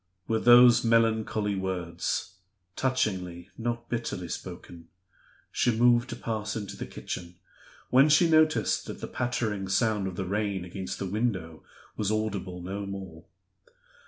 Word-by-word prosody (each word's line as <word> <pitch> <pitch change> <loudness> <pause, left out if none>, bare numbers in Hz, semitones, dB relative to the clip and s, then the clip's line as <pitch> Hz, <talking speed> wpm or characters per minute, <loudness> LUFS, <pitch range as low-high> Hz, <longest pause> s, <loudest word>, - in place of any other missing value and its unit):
With 110 0 -1
those 120 0 +8
melancholy 110 -2 +2
words 95 0 -3 0.4
touchingly, 95 -9 -1
not 120 0 -3
bitterly 115 -7 -3
spoken 85 -1 -8 0.6
she - - +1
moved 120 +1 +4
to - - -4
pass 110 -2 -3
into 105 -3 -5
the - - -6
kitchen, 85 0 -7 0.6
when 135 +4 +6
she 155 +4 +5
noticed 155 - +3
that - - -7
the - - -5
pattering 110 -5 -2
sound 100 0 +1
of 95 - -5
the 95 - -3
rain 100 -1 -2
against 95 +1 -6
the - - -4
window 95 -6 -2 0.3
was 105 -2 0
audible 100 -5 -3
no 100 +2 -4
more. 95 -4 -8
105 Hz, 135 wpm, -28 LUFS, 95-120 Hz, 0.6 s, those